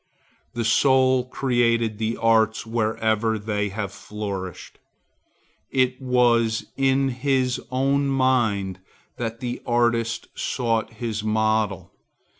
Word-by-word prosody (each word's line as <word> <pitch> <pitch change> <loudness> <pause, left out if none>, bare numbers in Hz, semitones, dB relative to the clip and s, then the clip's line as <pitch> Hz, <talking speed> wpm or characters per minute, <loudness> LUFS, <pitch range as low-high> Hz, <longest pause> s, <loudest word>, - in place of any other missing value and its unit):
The 115 -1 -2
soul 130 +2 +3
created 115 -4 0
the 110 +1 -1
arts 110 -1 +2
wherever 110 0 0
they 105 -1 -2
have 100 -1 -4
flourished. 100 -3 -7 0.9
It 130 0 +1
was 120 -3 +2
in 135 0 +2
his 130 0 0
own 135 +2 +1
mind 120 -8 +1 0.4
that 115 0 -4
the 125 -1 -4
artist 120 -1 0
sought 115 -3 -1
his 110 -1 -4
model. 110 -2 0
115 Hz, 100 wpm, -23 LUFS, 110-130 Hz, 0.9 s, soul